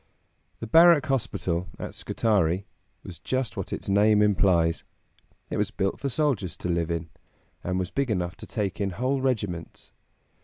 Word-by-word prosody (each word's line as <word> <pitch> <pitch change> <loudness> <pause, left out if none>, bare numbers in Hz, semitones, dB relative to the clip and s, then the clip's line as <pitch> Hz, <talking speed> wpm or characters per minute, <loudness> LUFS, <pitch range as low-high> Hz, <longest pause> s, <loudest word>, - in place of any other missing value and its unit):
The - - -3
Barrack 165 +4 +6
Hospital 95 -9 -1
at - - -6
Scutari 95 -4 0 0.4
was 85 -4 -9
just 130 0 -2
what - - -5
its - - -5
name 105 +1 +4
implies. 90 -5 +2 0.7
It - - -1
was 105 0 0
built 95 -3 -2
for 140 - -2
soldiers 125 - -1
to 90 - -4
live 85 -1 0
in, 85 -1 -3 0.5
and 90 0 -1
was 90 -1 -2
big 140 -2 -1
enough 90 -4 -1
to - - -10
take 100 -2 -3
in 100 - 0
whole 130 +2 0
regiments. 100 -10 -3
100 Hz, 160 wpm, -26 LUFS, 90-125 Hz, 0.7 s, Barrack